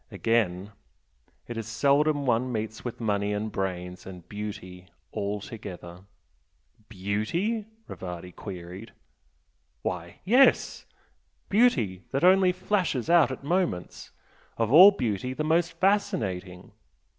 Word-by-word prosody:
Again, 105 -4 0 0.8
it 120 - -6
is 115 - -5
seldom 140 +5 +2
one 125 +1 +1
meets 110 -1 -4
with 120 - -6
money 105 -2 0
and 105 +1 -3
brains 90 -2 -4
and 90 -2 -10
beauty 100 -3 -7 0.2
all 100 +1 -3
together!" 95 -5 -9 0.8
"Beauty?" 110 - -2 0.2
Rivardi 90 0 -7
queried. 90 +2 -9 0.9
"Why, 85 -1 -4
yes! 250 +7 +3 0.6
beauty 130 - +2
that 135 +4 -2
only 185 0 +6
flashes 180 - -1
out 170 -4 +6
at 130 +1 -7
moments 170 - -2 0.5
of 115 0 0
all 180 +7 +10
beauty 125 - -2
the 155 - -3
most 165 +2 +1
fascinating! 100 - -1
110 Hz, 110 wpm, -27 LUFS, -, 0.9 s, all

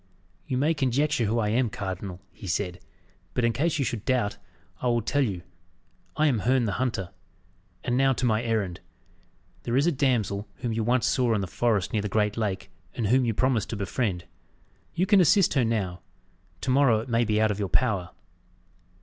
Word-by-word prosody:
"You 130 - -1
may 150 +5 +2
conjecture 140 -2 +1
who 110 +3 0
I 105 -2 +1
am, 120 +2 +1
cardinal," 95 -2 -5
he 100 - -11
said, 90 +1 -2 0.6
"but 125 - +2
in 115 - +2
case 155 +7 0
you 140 - 0
should 115 -3 -3
doubt, 115 -6 0 0.4
I 125 - 0
will 120 -2 +1
tell 145 +5 +1
you. 95 -9 -1 0.7
I 155 - +3
am 130 -7 +2
Herne 125 +4 +2
the 105 - 0
Hunter! 100 -8 -2 0.7
And 120 - 0
now 135 0 +4
to 130 - -2
my 110 -2 +2
errand. 110 -7 -1 0.8
There 120 +2 -1
is 140 - +3
a 175 - +3
damsel, 115 - 0
whom 120 -3 -3
you 110 0 -1
once 120 +2 +2
saw 125 -4 +2
in 105 - 0
the - - -2
forest 105 0 0
near 110 - +1
the 105 - -3
great 105 0 +1
lake, 100 -3 -3 0.2
and 110 -4 -1
whom 130 +2 +4
you 115 -2 0
promised 130 -3 +1
to - - -3
befriend. 100 -2 -2 0.7
You 180 +2 +2
can 200 -1 +5
assist 180 +2 +4
her 135 - +3
now 100 -6 -1 0.6
to 130 - 0
morrow 130 -5 +4
it 115 - -9
may 115 -1 +2
be 105 -2 +1
out 110 -1 +3
of 105 - -4
your 100 -2 -2
power." 100 -8 +1
115 Hz, 200 wpm, -26 LUFS, 105-130 Hz, 0.8 s, can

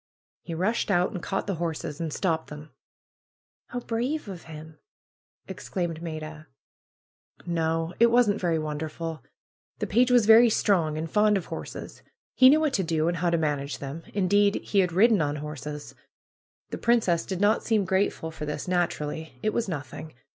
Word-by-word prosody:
^^He 165 - -3
rushed 215 +7 0
out 180 -2 +2
and 180 - -5
caught 195 - -2
the 195 -4 -3
horses 160 -3 -3
and 165 -2 -3
stopped 160 -1 -1
them." 150 0 -10 1.0
^^How 245 -1 -5
brave 245 +5 -2
of 185 -4 -8
him!" 160 0 -11 0.7
exclaimed 170 -4 -4
Maida. 155 -1 -7 1.0
^^No, 165 0 -1
it 235 +1 +6
wasn't 230 -3 +3
very 170 -3 +1
wonderful. 155 +1 -4 0.6
The - - -2
page 250 +2 +3
was 245 -3 +5
very 225 +2 +8
strong, 170 -8 +1
and 160 +1 -3
fond 210 +3 +3
of 185 - -5
horses. - - -8 0.3
He 255 - +7
knew 300 +3 +5
what 305 -3 +1
to 195 - +1
do, 160 -1 0
and 175 0 0
how 175 +1 +1
to 170 - +2
manage 145 -4 -2
them. 140 +4 -6
Indeed, 205 +1 +3
he 200 - +1
had 180 -2 +2
ridden 205 +2 +4
on 145 -1 0
horses. 150 0 -7 0.8
The - - -4
princess 220 -8 +2
did 190 -2 -4
not 205 +2 +3
seem 215 -4 +1
grateful 190 -4 0
for 150 -1 -7
this, 150 +2 -4
naturally. 165 -3 -2
It 215 - +1
was 230 -4 -1
nothing. 145 -1 -7
170 Hz, 170 wpm, -26 LUFS, 155-205 Hz, 1.0 s, very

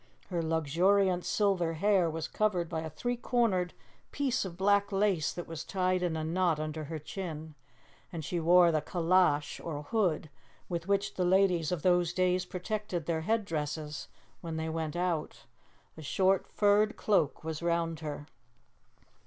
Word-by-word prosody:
Her 175 -3 -1
luxuriant 175 +4 +2
silver 190 -5 +1
hair 185 0 +2
was 160 0 -4
covered 195 -5 0
by 160 0 -3
a 160 0 -4
three 245 +11 -2
cornered 230 -7 0 0.4
piece 270 -3 0
of 175 -3 -7
black 200 +1 +3
lace 195 -6 +1
that 175 - -6
was 165 -2 -6
tied 185 -1 0
in 170 -3 -1
a 155 - -2
knot 170 0 +1
under 155 0 -4
her 160 +2 -5
chin, 160 -1 -6 0.6
and 160 -4 -5
she 175 +5 -2
wore 175 +1 +6
the 155 -1 +1
'calash,' 165 -2 +2
or 150 -3 -4
hood, 175 -6 0 0.4
with 170 0 -4
which 200 0 +1
the 185 - -1
ladies 180 -3 +3
of 175 -4 -2
those 175 -2 +3
days 185 0 +1
protected 185 -2 -3
their 160 -1 -1
headdresses 160 -7 -2 0.3
when 165 -2 -5
they 160 0 -2
went 160 -1 -3
out. 175 -3 -2 0.5
A 160 - -10
short 190 +5 +1
furred 210 +1 +2
cloak 160 -11 +1
was 160 0 -4
round 170 -1 0
her. 150 -2 -6
175 Hz, 160 wpm, -30 LUFS, 160-190 Hz, 0.6 s, wore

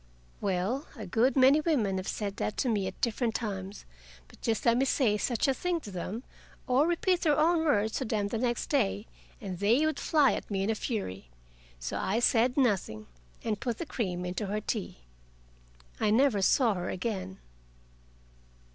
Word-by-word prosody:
Well, 200 - -1
a 215 - -7
good 230 +9 +2
many 270 +3 +6
women 235 - +1
have 185 - -4
said 200 -2 -3
that 215 - -2
to 260 - +1
me 205 -4 0
at - - -7
different 235 0 0
times. 195 -3 -4 0.4
But - - -19
just 225 -1 -1
let 235 0 +4
me 265 - +2
say 255 -5 +2
such 235 +4 0
a 270 - +3
thing 355 +5 -1
to 205 - -9
them, 190 +6 -5 0.4
or 265 +4 +3
repeat 345 +1 +1
their 300 -4 +3
own 330 +2 +4
words 220 -7 +2
to 265 - -2
them 210 -3 -1
the 225 - -2
next 240 -1 -1
day, 215 -7 +1 0.3
and 190 -4 -6
they 230 +9 +3
would 315 - -1
fly 295 -4 +3
at - - -5
me 195 -2 -1
in 210 - +1
a - - +2
fury. 195 - -4 0.5
So - - -4
I 200 - 0
said 240 +2 +3
nothing, 190 - +1 0.4
and 215 -3 -1
put 240 -4 -2
the - - -4
cream 180 - -3
into 185 +3 -3
her 210 +2 -1
tea. 215 - -4 1.0
I 215 - +2
never 225 -1 +3
saw 230 +4 +4
her 180 -1 -4
again. 190 -1 -4
220 Hz, 185 wpm, -29 LUFS, 195-260 Hz, 1.0 s, many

